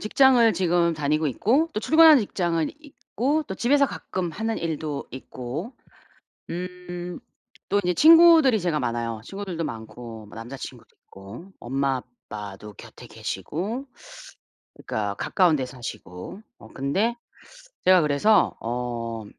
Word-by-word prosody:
직장을 240 0 +4
지금 175 -1 +2
다니고 155 +1 0
있고 255 - +1
또 215 - -2
출근하는 315 +2 +7
직장은 170 -6 -1
있고 285 +1 -2
또 190 - -6
집에서 280 +7 +3
가끔 185 -8 -4
하는 220 +7 -3
일도 155 -3 -4
있고 130 - -7 0.8
음 180 0 -6 0.5
또 200 +1 +3
인제 180 -1 0
친구들이 320 - +7
제가 170 -4 0
많아요. 115 -2 -3
친구들도 190 -1 -5
많고 110 -2 -8
뭐 105 - -14
남자 115 +4 -8
친구도 - - -9 0.2
있고 100 - -12
엄마 135 +1 -1 0.3
아빠도 105 0 -8
곁에 - - -13
계시고 220 - -5 0.9
그러니까 100 -2 -3
가까운 175 - +2
데 130 - -2
사시고 120 - -8 0.2
어 - - -13
근데 195 - 0 0.7
제가 185 -1 +6
그래서 160 +8 +3
어 115 -1 -4
170 Hz, 275 characters per minute, -24 LUFS, -, 0.9 s, 출근하는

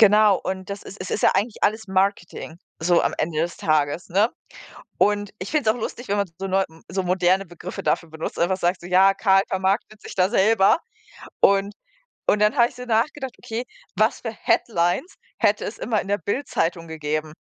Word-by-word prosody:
genau, 210 -1 +6
und 190 0 -4
das 200 0 -5
ist 195 - -11
es 185 - -5
ist - - -2
ja - - +6
eigentlich 205 +3 -1
alles 220 +2 +1
Marketing, 190 -4 -1 0.2
so 175 +1 +3
am - - 0
Ende 155 0 -1
des 170 +1 -2
Tages, 155 +2 0
ne, 200 +6 +3 0.7
und 205 -1 +2
ich 185 - -6
finde 290 -8 +2
es 225 - 0
auch - - -8
lustig, 245 +3 -5
wenn 200 - +1
man 200 -1 +1
so 195 - -3
neu 195 0 +2 0.2
so 190 +2 -2
moderne 185 +1 +2
Begriffe 175 +1 -8
dafür 165 - 0
benutzt, 160 0 -6
einfach 185 +2 +2
sagt 175 0 0
so: 175 - -10
„Ja, 190 +2 +5
Karl 195 -1 +4
vermarktet 195 +3 -1
sich 210 - -9
da 185 -2 +3
selber“ 215 +2 +4 0.6
und 200 +1 +3 0.5
und 210 - +3
dann 210 +5 +3
habe 235 -1 +5
ich - - -18
so 250 - -8
nachgedacht: 250 +3 0
„Okay, 240 0 -4 0.3
was - - +2
für - - -4
headlines 175 - 0 0.2
hätte 210 +1 +2
es 210 - -6
immer 220 -3 0
in - - -10
der 205 - +2
BILD-Zeitung 175 - -2
gegeben?“ 155 -1 -3
195 Hz, 200 wpm, -23 LUFS, 175-215 Hz, 0.7 s, genau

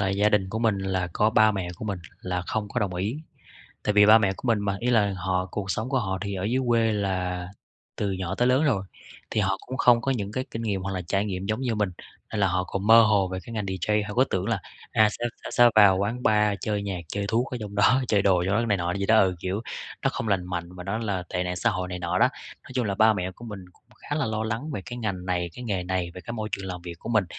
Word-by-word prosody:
là 100 - +1
gia 100 +2 +3
đình 105 -3 +2
của 110 - -2
mình 110 -3 +2
là 95 -2 -1
có 105 +1 +2
ba 110 -1 +5
mẹ 95 -3 -3
của - - -7
mình 100 -4 -3 0.2
là 90 -1 -2
không 105 -2 -2
có 120 - -2
đồng 95 -3 -1
ý. 100 +9 -2 0.7
Tại 105 - +2
vì 105 0 +7
ba 110 +1 +9
mẹ 100 -3 +1
của - - -8
mình 115 - +3
mà, 100 -1 -1
ý 125 - 0
là 105 -4 +3
họ 95 0 -1
cuộc 95 -1 -4
sống 110 +6 -2
của 130 -1 +1
họ 95 -3 -2
thì 100 -1 -3
ở 95 0 -3
dưới 125 +5 +1
quê 115 -2 +3
là 90 -3 -2 0.5
từ 100 -2 -1
nhỏ 95 0 -3
tới 125 +5 +2
lớn 130 +4 +3
rồi, 115 -10 +1 0.5
thì 110 - +1
họ 95 -1 +1
cũng 130 - -5
không 120 -1 +5
có 135 +3 0
những 105 -4 -3
cái 130 +3 -2
kinh 115 - -4
nghiệm 100 -4 -1
hoặc 95 +1 -3
là 95 - -3
trải 95 +4 0
nghiệm 95 -2 -4
giống 110 +4 -1
như 120 -4 0
mình, 105 -3 0 0.4
nên 105 - -1
là 100 - +4
họ 90 +1 0
còn 100 +2 -4
mơ 115 +1 +9
hồ 105 -4 +3
về 95 0 -4
cái 115 - -9
ngành 110 -2 -2
DJ. 105 +3 0
Họ 105 - -5
cứ 130 +2 +5
tưởng 95 0 -1
là 110 -5 0 0.3
à, 110 -1 +5
sẽ 120 - -5 0.3
sẽ 120 0 +6
vào 100 -3 +7
quán 110 +6 -2
bar 105 -1 +3
chơi 105 -2 -1
nhạc, 95 -3 -3
chơi 100 +3 -3
thuốc 120 +5 +1
ở 125 - -3
trong 105 -1 -6
đó, 115 +6 +4
chơi 100 -2 +3
đồ 90 -3 +3
trong 95 - +1
đó, 115 +2 +1
này 105 - +2
nọ 90 -1 -2
gì 100 0 -2
đó 110 0 +5
ừ, 95 -2 +3
kiểu 95 +4 -2 0.4
nó - - +2
không 115 - -4
lành 95 -3 +1
mạnh 90 -1 -4
và 90 - -8
nó 100 +4 -2
là 100 -5 -2
tệ 90 - -1
nạn 90 0 -3
xã 115 +5 +2
hội 95 -4 -3
này 90 0 -4
nọ 90 +1 -1
đó. - - +5 0.4
Nói - - -15
chung 125 - +1
là 100 - -1
ba 110 +2 +5
mẹ 95 -2 -2
của 120 - -13
mình 105 -5 -7
cũng - - -30 0.2
khá 145 - -4
là 150 - 0
lo 110 0 -2
lắng 115 +7 -3
về 100 - -3
cái 120 - -6
ngành 95 -5 -3
này, 90 -1 -1
cái 125 - -8
nghề 100 -6 -1
này, 90 -1 -2
về 90 - -8
cái 115 - -7
môi 110 -2 -3
trường 100 -1 -3
làm 90 -1 -6
việc 85 -1 -7
của - - -9
mình. 110 -4 +3
100 Hz, 295 wpm, -26 LUFS, 95-110 Hz, 0.7 s, ba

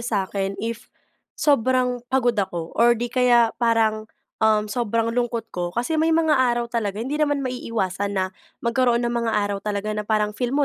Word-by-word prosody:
sa'kin 195 -3 -2
if 230 +1 -5 0.5
sobrang 255 -3 +2
pagod 255 -2 +2
ako 175 -6 -3
or 235 0 +4
di 240 +1 -4
kaya 240 -2 +4
parang, 220 -2 +1 0.3
um, 215 -1 +3
sobrang 230 +1 -1
lungkot 235 -2 -2
ko. 175 -1 -2
Kasi 245 - -1
may 320 0 +3
mga 320 -2 +3
araw 240 -3 +2
talaga 210 -4 -1
hindi 265 +8 -3
naman 290 -2 +1
maiiwasan 205 -6 -2
na 190 - +2 0.4
magkaroon 240 0 +2
ng 240 - -1
mga 235 -1 0
araw 205 -1 0
talaga 210 +1 -3
na 210 - -2
parang 210 -1 +1
feel 245 +3 -2
mo 290 - +3
230 Hz, 175 wpm, -23 LUFS, 210-250 Hz, 0.5 s, or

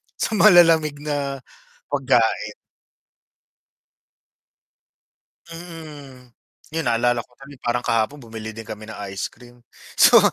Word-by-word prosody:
sa - - -2
malalamig 165 -7 +6
na 140 -3 -3 0.5
pagkain. - - +1 3.0
Mm. 150 -7 -11 0.4
'Yon, 165 - 0
naalala 120 -1 +1
ko - - -28
tuloy 140 +1 -13
parang 120 +1 -1
kahapon 115 +6 0
bumili 110 -3 -8
din 110 0 -10
kami 110 0 -8
ng 110 - -9 0.2
ice 100 - -3
cream. 120 -1 -18 0.3
So, - - +7
125 Hz, 105 wpm, -22 LUFS, 115-150 Hz, 3.0 s, So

